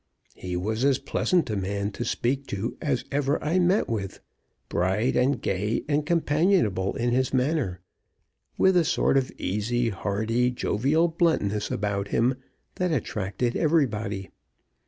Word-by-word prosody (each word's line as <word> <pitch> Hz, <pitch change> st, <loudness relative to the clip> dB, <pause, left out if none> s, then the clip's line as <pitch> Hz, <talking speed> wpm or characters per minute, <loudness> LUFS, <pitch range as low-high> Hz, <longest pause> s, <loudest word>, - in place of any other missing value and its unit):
He 90 Hz, -1 st, -5 dB
was 110 Hz, +6 st, -2 dB
as 140 Hz, -2 st, +4 dB
pleasant 160 Hz, +1 st, 0 dB
a -, -, -1 dB
man 100 Hz, +1 st, -2 dB
to 110 Hz, -, -4 dB
speak 135 Hz, +3 st, -1 dB
to 110 Hz, +5 st, -3 dB
as 140 Hz, -5 st, -1 dB
ever 145 Hz, +1 st, +1 dB
I 165 Hz, +5 st, +1 dB
met 180 Hz, +3 st, +3 dB
with 100 Hz, -4 st, -4 dB, 0.5 s
bright, 95 Hz, +8 st, 0 dB
and 130 Hz, +2 st, +2 dB
gay, 105 Hz, +5 st, -1 dB
and 150 Hz, 0 st, +1 dB
companionable 155 Hz, -, +2 dB
in 120 Hz, +1 st, 0 dB
his 130 Hz, +1 st, +1 dB
manner 130 Hz, -, 0 dB, 0.8 s
with 190 Hz, 0 st, +4 dB
a 175 Hz, -, +5 dB
sort 160 Hz, -3 st, +1 dB
of 135 Hz, -2 st, +1 dB
easy, 115 Hz, +5 st, -1 dB
hearty, 110 Hz, +4 st, 0 dB
jovial 135 Hz, +7 st, +1 dB
bluntness 160 Hz, -, 0 dB
about 100 Hz, -1 st, -2 dB
him 120 Hz, +5 st, +2 dB, 0.4 s
that 180 Hz, -1 st, 0 dB
attracted 120 Hz, -3 st, -2 dB
everybody. 110 Hz, -, 0 dB
120 Hz, 140 wpm, -26 LUFS, 105-145 Hz, 0.8 s, a